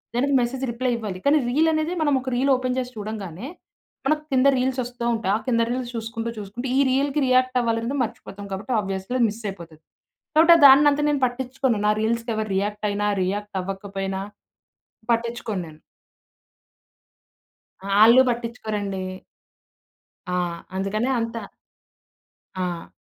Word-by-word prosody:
దానికి 275 +4 +1
message 255 +2 -2
reply 250 +2 -1
ఇవ్వాలి, 205 -5 -5
కానీ 290 +2 +5
రీలనేదే 315 +4 +1
మనమొక 270 -4 +1
రీలోపెన్ 255 -1 +1
చేసి 250 -1 -4
చూడంగానే, 205 -1 -6 0.6
మనకు 305 +1 +1
కింద 260 +1 +4
రీల్సొస్తూ 250 -2 -2
ఉంటాయి. 210 -3 0
ఆ - - -7
కింద 230 -2 +2
రీల్స్ 250 -1 -3
చూసుకుంటూ, 225 0 -4
చూసుకుంటూ 210 +6 -6
ఈ - - +4
రీల్‌కి 280 +2 +1
రియాక్టవ్వాలనేది 255 -1 +1
మర్చిపోతాం 205 -3 -7
కాబట్టి, 210 +6 -4
ఆబ్వియస్లీ 195 +4 -4
అది 240 - +5
మిస్సయిపోతది. 195 -7 -8 0.5
కాబట్టి, 330 +2 +7
ఆహ్, 315 - +2
దాన్నంత 285 +2 +6
నేను 290 -2 0
పట్టిచ్చుకోను. 255 -1 -1
నా 210 - +4
రీల్స్‌కెవరు 225 -1 -1
రియాక్టయినా, 205 0 -1 0.2
రియాక్టవ్వకపోయినా 195 0 -4 0.9
పట్టిచ్చుకోను 230 -4 -2
నేను. 155 0 -15 2.0
ఆ! 195 - -8
ఆళ్ళు 235 +4 +8
పట్టిచ్చుకోరండి. 215 -5 -3 1.3
ఆ! - - -1 0.4
అందుకనే 195 +5 -1
అంతా. 230 0 -3 1.1
ఆ! 180 -2 -4
230 Hz, 115 wpm, -23 LUFS, 205-255 Hz, 2.0 s, ఆళ్ళు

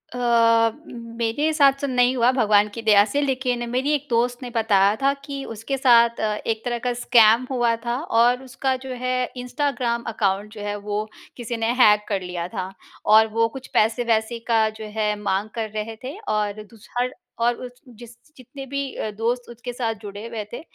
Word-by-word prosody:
अ, 230 -2 +3 0.2
मेरे 235 +5 -2
साथ 280 -3 +6
तो 280 - -1
नहीं 250 0 +2
हुआ 245 +1 +4
भगवान 210 -5 +3
की 230 - -6
दया 210 -2 +6
से 285 +7 -1
लेकिन 255 -3 -1
मेरी 260 +4 0
एक 290 0 -1
दोस्त 245 +2 0
ने 245 - -5
बताया 205 -2 +3
था 275 +1 +3
कि 275 -1 -5
उसके 270 +6 -3
साथ 235 -3 +4
अ, 215 -1 0
एक 220 -1 -1
तरह 240 -1 -1
का 245 - +1
स्कैम 230 0 +5
हुआ 240 -2 +2
था 240 +1 -1 0.2
और 245 +2 +3
उसका 260 0 -2
जो 255 - -4
है 255 0 0
इंस्टाग्राम 250 -2 -2
अकाउंट 205 +1 -1
जो 210 - -9
है 205 0 -2
वो 210 +1 -1 0.3
किसी 235 -1 -4
ने 225 +1 0
हैक 210 0 +5
कर 195 -3 -1
लिया 180 -1 -4
था। 185 +1 -5 0.3
और 220 +1 +6
वो 230 0 +3
कुछ 260 - -10
पैसे-वैसे 230 0 +1
का 225 -2 +3
जो 215 - -6
है 210 -1 +1
माँग 200 +1 -1
कर 220 -2 -3
रहे 220 +1 -4
थे 275 +9 -6
और 210 0 -1
दूस 215 +1 -18
हर 250 +1 0 0.3
और 240 0 +2
उस 250 -1 -7 0.3
जिस 235 0 -12 0.2
जितने 265 +2 -10
भी 280 +1 -4 0.2
अ, 215 - -3
दोस्त 240 +2 -2
उसके 240 +1 -7
साथ 230 -2 -2
जुड़े 205 +1 -8
हुए 225 -2 -5
थे - - -5
235 Hz, 195 wpm, -23 LUFS, 215-250 Hz, 0.3 s, साथ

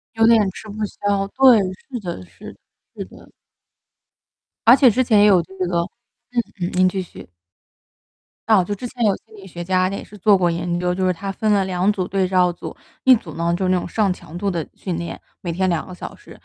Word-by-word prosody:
有 225 0 +4
点 230 -1 +6
吃 215 - -11
不 210 +1 -4
消， 200 -1 -1
对， 260 -3 +7 0.2
是 245 +4 -8
的 175 - -6
是 - - -12
的 - - -22 0.4
是 - - -5
的。 - - -17 1.4
而 240 +3 +9
且 260 -4 +6
之 255 +5 +2
前 220 -4 +4
也 205 - +6
有 185 -4 +5
这 190 - -15
个 175 -1 0 0.8
嗯 175 - -1
嗯， - - -13
您 185 0 +4
继 190 +1 -2
续。 175 - -12 1.2
啊， 200 -5 +5
就 205 - -3
之 245 +5 -7
前 240 -1 -3
有 205 -3 +3
心 220 - -15
理 195 -1 -12
学 175 -1 -7
家 185 +1 +1
也 200 - -5
是 210 - -14
做 205 0 +4
过 175 -2 +2
研 175 +1 -2
究， 180 0 0
就 185 0 0
是 185 - +3
他 195 +3 -6
分 215 +2 0
了 195 -2 +2
2 185 +2 +1
组 185 -3 -3
对 195 -1 0
照 180 -1 +3
组， 175 - -8 0.3
1 260 -1 +8
组 220 - -5
呢 170 +1 -1
就 185 +1 -1
那 185 - +3
种 - - -5
上 205 +2 0
强 175 -2 -7
度 200 +1 -1
的 170 -4 -3
训 180 -4 -4
练， 170 0 -6 0.2
每 170 -2 -3
天 185 +2 0
2 170 -3 -1
个 185 - -9
小 - - -8
时， - - -18
190 Hz, 235 characters per minute, -21 LUFS, 175-210 Hz, 1.4 s, 而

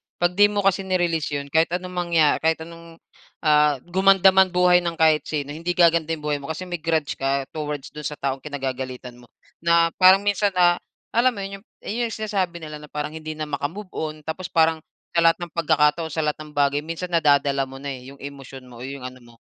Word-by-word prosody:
'pag 175 0 +1
di 205 +3 +5
mo 205 -1 -2
kasi 195 -1 +3
ni-release 175 -6 -1
yun 140 0 -5
kahit 160 +2 +3
anong 180 0 -5
mangya 170 -4 +2
kahit 160 0 0
anong, 165 0 -13 0.5
ah, 150 -1 +4
gumanda 190 +1 +5
man 190 0 +5
buhay 180 0 +4
ng 170 -1 -3
kahit 160 -1 +3
sino, 145 -2 -3
hindi 170 +4 -3
gaganda 170 -2 +4
yung 150 - -14
buhay 150 -1 -1
mo, 140 - -9
kasi 160 +3 -4
may 175 -2 -5
grudge 160 -3 -1
ka 135 0 0
towards 150 -2 -5
dun 150 0 -5
sa 150 - -6
taong 135 -1 -3
kinagagalitan 130 -3 -6
mo 120 - -17 0.3
na 170 0 +3
parang 190 +2 +7
minsan, 205 -1 +1
ah, 175 -1 +4 0.3
alam 240 +1 +2
mo 200 - -5
yun 195 0 -7 0.5
sinasabi 195 -6 -3
nila 150 -1 -7
na 150 - -12
parang 150 0 -4
hindi 155 0 -7
na 155 0 -5
maka-move 160 +8 -4
on. 155 -1 -3
Tapos 170 +3 -4
parang 160 -1 +3 0.4
sa - - +4
lahat 165 +1 +4
ng 175 -1 -6
pagkakataon 155 0 +1
sa 160 - -1
lahat 150 0 -1
ng - - -14
bagay 145 0 +2
minsan 165 +4 -6
nadadala 140 -4 +2
mo 135 - -11
na 140 +1 -6
eh, 130 -1 -9
yung 140 +1 -13
emosyon 135 -2 -9
mo 120 - -12
o 125 - -6
'yong 140 -1 -8
ano 130 0 -8
mo, 120 -1 -19
160 Hz, 215 wpm, -23 LUFS, 145-175 Hz, 0.5 s, parang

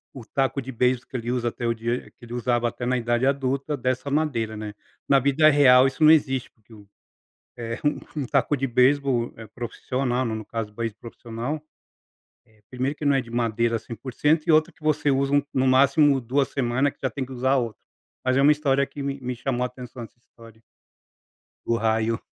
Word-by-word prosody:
o 130 - -8
taco 135 +2 -1
de 130 +1 -7
beisebol 125 0 0
que 130 - -4
ele 120 0 -3
usa 125 -1 -1
até 120 +1 -4
o 115 - +2
dia 115 +2 -4
que 120 - -16
ele 120 - -9
usava 120 0 0
até 120 +1 -5
na 125 +1 +1
idade 120 +1 0
adulta 140 +1 0
dessa 130 +2 -2
madeira, 130 -8 0
né. 105 -1 -6 0.4
Na 140 -1 +6
vida 140 +3 +4
real 135 -3 +6
isso 135 +3 -2
não 155 - +8
existe, 135 -5 +2
porque 110 0 -22
o 105 -2 -15 0.7
eh, 115 0 -5
um 145 - +3 0.2
um 145 - -1
um - - -4
taco 140 +2 +1
de 135 +1 -1
beisebol, 125 0 +2
eh, 110 -1 -10
profissional, 125 +3 -3
no 115 - -2
no - - -2
no 110 - -9
caso 115 -1 -4
do 105 - -25
beisebol 115 -1 -4
profissional, 120 +5 -6 0.9
eh, 110 -1 -28
primeiro 130 +3 -2
que 155 - -10
não 140 -1 +4
é 135 - +2
de 120 - -13
madeira 115 0 0
100% 130 +8 -1
e - - +5
outra 155 0 +4
que - - -30
você 150 -1 +2
usa 135 +1 +1
um 145 - +3
no 130 0 +2
máximo, 140 +2 +4
2 130 +3 0
semanas 130 +2 0
que - - -38
já 130 - +1
tem 135 -2 -4
que 130 - -14
usar 130 +2 +1
outro. 115 -4 -3 0.4
Mas 130 0 +2
é - - +4
uma 145 +2 +6
história 140 -2 +2
que 145 - -7
me 140 0 -3
me 125 0 -4
chamou 125 0 -2
atenção 125 -1 -8
essa 115 - -14
história 115 -2 -18 1.1
do 115 - +1
raio. 110 0 +1
125 Hz, 220 wpm, -24 LUFS, 115-140 Hz, 1.1 s, não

